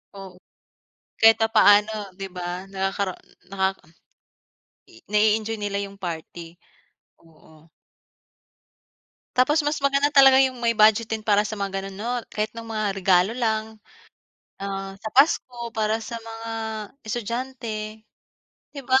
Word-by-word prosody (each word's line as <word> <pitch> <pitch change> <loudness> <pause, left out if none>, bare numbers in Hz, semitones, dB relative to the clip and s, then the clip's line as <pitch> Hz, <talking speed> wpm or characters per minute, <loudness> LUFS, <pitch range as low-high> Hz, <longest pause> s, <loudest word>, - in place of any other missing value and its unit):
Oo. 190 -2 -11 0.8
Kahit 225 -1 +7
papaano, 210 -2 +4
'di 195 0 -6
ba? 180 +1 -5
Nakakara 195 0 -2 0.4
naka 190 0 0 1.1
i 115 - -17
nai-enjoy 215 +1 +1
nila 205 -1 -2
yung 200 0 -12
party. 170 0 -7 0.6
Oo. 160 -1 -21 1.7
Tapos 295 +5 +4
mas 295 +1 -1
maganda 280 +1 +2
talaga 270 -2 +7
yung 260 -1 +1
may 235 -1 +1
budget 220 +1 +5
din 220 - -3
para 210 -1 +2
sa 215 - -4
mga 200 -1 -2
ganon 195 0 -6
'no? 210 +5 -5 0.2
Kahit 215 0 -1
no'ng 230 - -7
mga 215 -1 -1
regalo 185 +1 +3
lang, 220 -2 -1 0.8
ah, 195 0 -5
sa 220 - -6
Pasko 245 -4 +2
para 220 0 -1
sa 230 +1 -6
mga 225 0 -8 0.6
estudyante, 225 -2 -5 0.7
'di 280 - -9
ba? 260 +1 +4
215 Hz, 125 wpm, -24 LUFS, 195-230 Hz, 1.7 s, Kahit